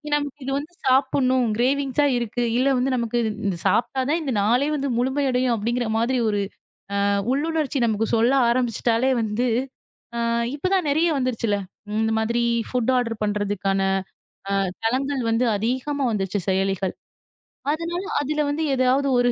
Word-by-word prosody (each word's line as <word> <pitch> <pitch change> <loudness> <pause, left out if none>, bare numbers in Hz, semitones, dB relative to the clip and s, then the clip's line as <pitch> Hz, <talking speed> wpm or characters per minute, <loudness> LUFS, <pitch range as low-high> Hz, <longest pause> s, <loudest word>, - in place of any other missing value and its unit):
நமக்கு 290 0 -3
இது 270 - -2
வந்து 305 +5 -6
சாப்பிடணும். 260 -1 +3
க்ரேவிங்ஸ்ஸ 275 +3 +1
இருக்கு. 240 0 -2 0.2
இல்ல 260 +2 +2
வந்து 260 +2 +1
நமக்கு 235 -1 -1 0.3
இது 190 -3 -1
சாப்பிட்டா 260 +3 +1
தான் 325 - +2
இந்த 275 -4 -2
நாளே 245 +7 +2
வந்து 280 -1 -1
முழுமை 265 +4 0
அடையும் 250 -1 +1
அப்படிங்கற 235 +2 -1
மாதிரி 240 +3 +1
ஒரு 205 -1 0 0.7
அ - - +2 0.2
உள்ளுணர்ச்சி 300 0 0
நமக்கு 220 -1 +1
சொல்ல 230 +3 +3 0.2
ஆரம்பிச்சுட்டாலே 240 +1 +1
வந்து, 220 +3 -1 0.7
அ - - -2 0.4
இப்போ 300 - -2
தான் 360 -5 0
நெறைய 320 +4 +3
வந்துருச்சிள்ள. 230 -5 0 0.4
இந்த 220 0 +1
மாதிரி 235 +2 0 0.3
ஃபுட் 250 0 +1
ஆர்டர் 230 -3 -2
பண்றதுக்கான 205 -2 0 0.7
அ - - +1 0.3
தளங்கள் 260 +3 0
வந்து 230 +3 +2
அதிகமா 260 +6 -1
வந்துடுச்சு, 200 -1 -1
செயலிகள். 190 0 0 0.8
அதனால, 335 +3 -2 0.2
அதுல 300 +2 -1
வந்து 300 +2 -1
ஏதாவது 260 +2 +2
ஒரு 245 0 +3
250 Hz, 145 wpm, -23 LUFS, 225-275 Hz, 0.8 s, சாப்பிடணும்